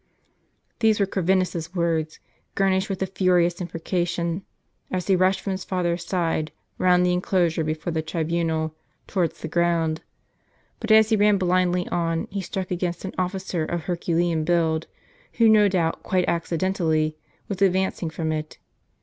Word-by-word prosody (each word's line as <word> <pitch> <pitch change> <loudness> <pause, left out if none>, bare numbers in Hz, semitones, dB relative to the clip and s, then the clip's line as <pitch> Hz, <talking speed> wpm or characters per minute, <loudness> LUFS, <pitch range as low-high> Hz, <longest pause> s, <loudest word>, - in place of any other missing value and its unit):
These 220 -2 +3
were 200 - +4
Corvinus's 185 -2 0
words, 165 -2 -1 0.4
garnished 190 +1 +1
with 190 -1 -2
a - - +1
furious 180 -1 +2
imprecation, 170 0 -2 0.5
as 185 -1 -2
he 195 - +3
rushed 185 +1 +2
from 195 - -3
his 190 0 -3
father's 175 -2 -1
side 165 -3 -1 0.3
round 180 -1 +4
the 180 - +2
enclosure 175 -2 +1
before 155 +2 -3
the 160 - 0
tribunal, 160 0 -1 0.3
towards 175 -5 -1
the - - -4
group. 170 -2 +1 0.8
But - - -5
as 220 0 +6
he 220 - +4
ran 210 -1 +4
blindly 180 -1 +1
on, 165 -1 -1
he 200 0 -2
struck 185 0 -4
against 175 0 -2
an 190 - -5
of&cer 185 -2 -2
of 170 +1 -3
herculean 170 -2 0
build, 160 -1 +1 0.5
who, 230 -1 +4
no 215 -1 +6
doubt 175 -4 0
quite 185 -2 0
accidentally, 165 -2 0 0.3
was 200 -2 -5
advancing 190 -3 +1
from 160 0 -3
it. 155 0 -4
175 Hz, 150 wpm, -24 LUFS, 165-190 Hz, 0.8 s, as